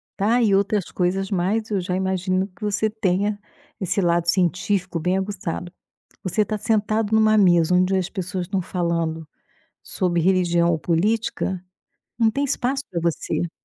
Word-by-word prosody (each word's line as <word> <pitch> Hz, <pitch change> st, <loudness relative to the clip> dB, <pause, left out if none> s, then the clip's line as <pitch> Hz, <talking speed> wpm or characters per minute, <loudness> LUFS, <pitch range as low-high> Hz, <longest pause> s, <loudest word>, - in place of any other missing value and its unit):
tá, 220 Hz, +5 st, +2 dB
e 210 Hz, -4 st, +3 dB
outras 200 Hz, -1 st, +1 dB
coisas 190 Hz, +2 st, -1 dB
mais, 200 Hz, +5 st, 0 dB
eu 195 Hz, -3 st, +1 dB
já 180 Hz, +1 st, -2 dB
imagino 185 Hz, 0 st, 0 dB
que 200 Hz, +3 st, -15 dB
você 210 Hz, +1 st, 0 dB
tenha 205 Hz, -1 st, 0 dB, 0.4 s
esse 190 Hz, +1 st, 0 dB
lado 170 Hz, -1 st, +1 dB
científico 180 Hz, +1 st, +1 dB
bem 180 Hz, +4 st, 0 dB
aguçado. 190 Hz, -3 st, -4 dB, 0.5 s
Você 200 Hz, +3 st, +1 dB
está 215 Hz, +1 st, -2 dB
sentado 215 Hz, 0 st, 0 dB
em -, -, +5 dB
um 220 Hz, -, +4 dB
mesa 175 Hz, -4 st, +4 dB
onde 185 Hz, +1 st, +3 dB
as 185 Hz, -1 st, -1 dB
pessoas 185 Hz, -2 st, -4 dB
estão 190 Hz, 0 st, -1 dB
falando 170 Hz, -3 st, -2 dB, 0.6 s
sobre 175 Hz, -2 st, -1 dB
religião 175 Hz, -1 st, +2 dB
ou 165 Hz, -, +1 dB
política, 190 Hz, +1 st, -1 dB, 0.5 s
não 230 Hz, -2 st, +4 dB
tem 280 Hz, +5 st, -1 dB
espaço 270 Hz, 0 st, -1 dB
para 170 Hz, -3 st, -2 dB
você. 170 Hz, 0 st, -1 dB
190 Hz, 160 wpm, -22 LUFS, 175-210 Hz, 0.6 s, em